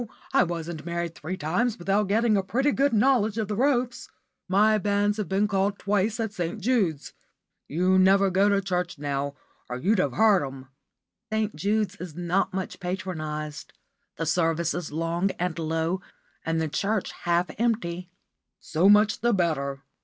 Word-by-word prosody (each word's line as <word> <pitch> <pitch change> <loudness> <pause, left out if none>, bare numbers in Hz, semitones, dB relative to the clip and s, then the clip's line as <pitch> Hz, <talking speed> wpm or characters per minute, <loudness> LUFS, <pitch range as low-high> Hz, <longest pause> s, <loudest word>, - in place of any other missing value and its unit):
I - - +5
wasn't 170 -2 -5
married 170 0 -3
three 180 +4 -6
times 205 +8 0
without 195 +3 +1
getting 220 +2 +2
a 195 - +3
pretty 265 +9 +1
good 280 +2 +2
knowledge 225 -2 +3
of 220 -2 -1
the 210 - -2
ropes. 250 0 0 0.4
My 210 +3 +4
banns 205 +1 +1
have 210 - -3
been 195 +2 +2
called 200 0 0
twice 205 +3 0
at 220 -2 -2
St. 175 +3 -3
Jude's. 195 - 0 0.5
You 185 +4 +2
never 195 +1 +4
go 195 +3 +3
to 200 -1 +2
church 180 -3 -2
now, 140 0 -3 0.3
or 125 - -3
you'd 195 - +1
have 140 -8 +1
heard 210 -5 +4
'em." 135 -1 -8 0.6
"St. 220 -1 -1
Jude's 205 -1 0
is 175 -5 -8
not 175 +3 0
much 190 -1 -4
patronised. 155 -5 -5 0.4
The 165 - -2
service 165 0 +1
is 175 -4 -4
long 165 +4 0
and 175 -2 -2
low, 165 +3 -1 0.4
and 165 0 -1
the 160 - 0
church 200 +6 -1
half 175 0 0
empty." 185 -7 -1 0.5
"So 170 +5 +2
much 210 +1 +5
the 240 0 +2
better." 140 -6 -1
185 Hz, 165 wpm, -26 LUFS, 165-210 Hz, 0.6 s, I